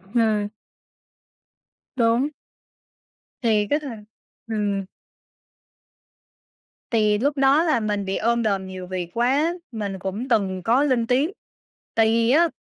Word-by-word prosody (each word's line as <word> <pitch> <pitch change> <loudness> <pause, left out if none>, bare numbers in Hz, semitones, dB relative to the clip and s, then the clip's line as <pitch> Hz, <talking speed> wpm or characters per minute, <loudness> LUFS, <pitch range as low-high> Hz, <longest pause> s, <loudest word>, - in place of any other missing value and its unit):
Ừm. 215 -3 +2 1.5
Đúng. 235 +4 +2 1.1
Thì 215 -4 +2
cái 295 - +2
thằng 235 -8 -8 0.4
ừm. 205 -3 -1 2.1
Thì 215 -2 +3
lúc 280 +5 0
đó 275 +4 +4
là 310 -8 +2
mình 210 -2 -2
bị 190 0 -2
ôm 235 +1 +1
đồm 195 -3 0
nhiều 185 -1 -7
việc 180 -2 -4
quá, 275 +8 +2 0.2
mình 205 -4 -4
cũng 195 +7 -4
từng 190 -5 +1
có 240 +8 +3
lên 250 -5 +1
tiếng, 270 +9 +2 0.6
tại 225 -1 +4
vì 230 +1 +2
á, 335 +5 +5
225 Hz, 125 wpm, -23 LUFS, 205-260 Hz, 2.1 s, á